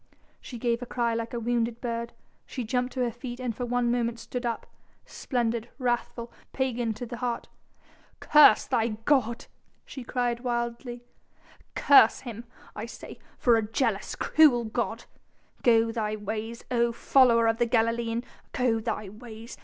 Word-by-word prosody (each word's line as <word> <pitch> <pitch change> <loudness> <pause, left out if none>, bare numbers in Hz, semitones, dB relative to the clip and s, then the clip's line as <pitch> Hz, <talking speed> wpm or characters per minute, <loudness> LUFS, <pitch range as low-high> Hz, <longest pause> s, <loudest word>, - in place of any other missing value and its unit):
She 245 - -9
gave 235 0 0
a 245 - -6
cry 235 -2 0
like 230 0 -3
a 240 - -3
wounded 235 0 -1
bird, 235 -1 -4 0.3
she 255 - -5
jumped 250 +2 -1
to 260 - -2
her 240 -1 +1
feet, 240 +1 -8
and 245 -3 -3
for 245 +1 -4
one 245 0 +1
moment 235 -1 0
stood 245 +1 -4
up, 230 - -3 0.4
splendid, 235 -2 -2
wrathful, 240 -2 -2 0.2
pagan 245 -4 -1
to 245 - -6
the 240 0 -7
heart. 240 -1 -3 0.7
"Curse 300 -7 +6
thy 225 0 +1 0.2
god," 235 -5 +1 0.4
she 265 - -8
cried 240 -1 -1
wildly, 240 0 -3 0.7
"curse 275 -6 +6
him, 235 -2 -8 0.3
I 210 +2 -5
say, - - -10 0.2
for 240 -2 +4
a - - +2
jealous, 225 -5 -1
cruel 290 -7 +4
god.... 225 0 -3 0.6
Go 230 -1 +4
thy 215 -2 -2
ways, 215 +2 -5
O 235 -1 +2
follower 235 -1 +4
of 225 0 +1
the 240 - +2
Galilean! 230 0 0 0.3
go 245 -3 +1
thy 215 -2 -3
ways! 225 +3 -10
235 Hz, 155 wpm, -27 LUFS, 230-245 Hz, 0.7 s, Curse